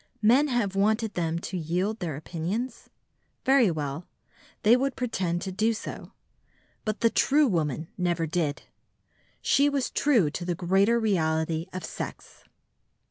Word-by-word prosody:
Men 255 +7 +5
have 235 -7 0
wanted 215 +2 +1
them 165 -1 -1
to 180 - -5
yield 180 +6 -1
their 165 -7 -3
opinions? 185 - -4 0.6
Very 265 -5 +5
well, 150 0 -4 0.6
they 225 +2 +7
would 270 +1 0
pretend 185 -9 -2
to 190 - -4
do 220 +5 +1
so. - - -7 0.7
But 215 0 -2
the 230 -1 +4
true 295 +2 +4
woman 160 - -1
never 175 -2 +1
did. 155 -3 -2 0.8
She 285 +1 +4
was 280 -2 -1
true 230 - +3
to 175 - -5
the 175 0 -1
greater 195 +7 +3
reality 160 -5 0
of 185 -3 -5
sex. - - -8
190 Hz, 140 wpm, -27 LUFS, 165-230 Hz, 0.8 s, they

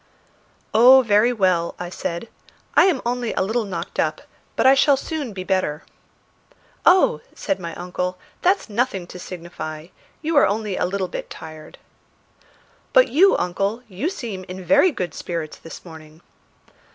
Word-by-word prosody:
"Oh, 255 +4 +8
very 215 +1 +4
well," 185 -7 +1
I 175 0 -6
said. 170 +4 -4 0.5
"I - - +6
am 345 -9 +1
only 245 -1 -1
a - - +1
little 220 +3 -1
knocked 175 -4 -6
up, - - 0 0.3
but - - +1
I 265 - +8
shall 275 0 +4
soon 290 -3 -4
be 190 -2 -6
better." 185 -5 -1 1.0
"Oh," 370 +2 +5
says 290 - -2
my 170 -2 -6
uncle, 180 +1 -4 0.2
"that's 375 +2 +2
nothing 210 -4 -1
to 180 - -11
signify. 170 -3 -7 0.3
You 315 0 0
are 280 - +6
only 210 -1 -2
a - - 0
little 190 0 -2
bit - - -6
tired." 155 -1 -11 1.2
"But - - +6
you, 380 +7 +5
uncle, 195 +6 -2
you 210 - -3
seem 225 - -6
in 185 0 -8
very 290 - +5
good 180 - -4
spirits 165 -3 -5
this 165 +2 -11
morning." 160 -1 -13
195 Hz, 155 wpm, -22 LUFS, 175-250 Hz, 1.2 s, Oh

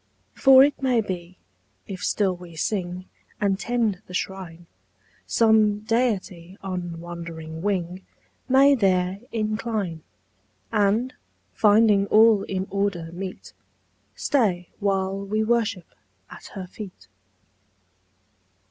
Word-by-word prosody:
"For 265 -1 +7
it 285 0 +1
may 255 -3 +2
be, 185 -3 -5 0.5
if 185 -3 -7
still 195 -3 +1
we 175 -2 -12
sing 180 +1 -3 0.3
And 200 -2 +1
tend 225 -5 -1
the 180 - -7
Shrine, 180 -3 -5 0.6
Some 215 -2 +3
Deity 205 -6 -1
on 180 -3 -4
wandering 165 -2 -7
wing 185 -2 -2 0.5
May 275 +2 +6
there 190 -5 +1
incline; 215 -6 -2 0.7
And, 215 +4 +1 0.4
finding 210 -1 +4
all 220 -1 +6
in 190 -1 -3
order 195 -4 -1
meet, 185 +2 -7 0.6
Stay 190 -11 0
while 195 -1 0
we 215 +2 -1
worship 225 -5 0 0.5
at - - -11
Her 190 -2 -5
feet." 180 - -11
195 Hz, 105 wpm, -24 LUFS, 180-220 Hz, 0.7 s, For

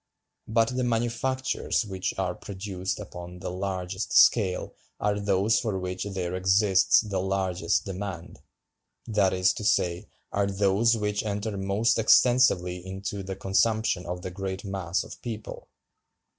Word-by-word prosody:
But 115 0 +2
the 130 - 0
manufactures 120 +2 -1
which 95 -2 -4
are 95 -2 -1
produced 95 -1 -5
upon 90 -3 -8
the 90 - -5
largest 95 +1 -3
scale 95 -6 +4 0.3
are 105 0 0
those 100 +2 +2
for 105 -5 -2
which 90 +1 -4
there 95 -3 -3
exists 95 +1 +4
the 100 -4 -3
largest 95 -1 0
demand—that 95 +2 -4
is 90 0 +2
to - - -6
say, 85 -4 +1 0.2
are 100 0 +1
those 100 +4 +2
which 105 -1 -1
enter 105 0 -3
most 100 +4 +1
extensively 105 -7 +4
into 95 +2 -5
the 95 0 -5
consumption 95 -1 +1
of 90 +1 -5
the 90 - -5
great 95 +1 -5
mass 95 -2 -2
of - - -11
people. 110 -3 -7
95 Hz, 135 wpm, -27 LUFS, 95-105 Hz, 0.3 s, scale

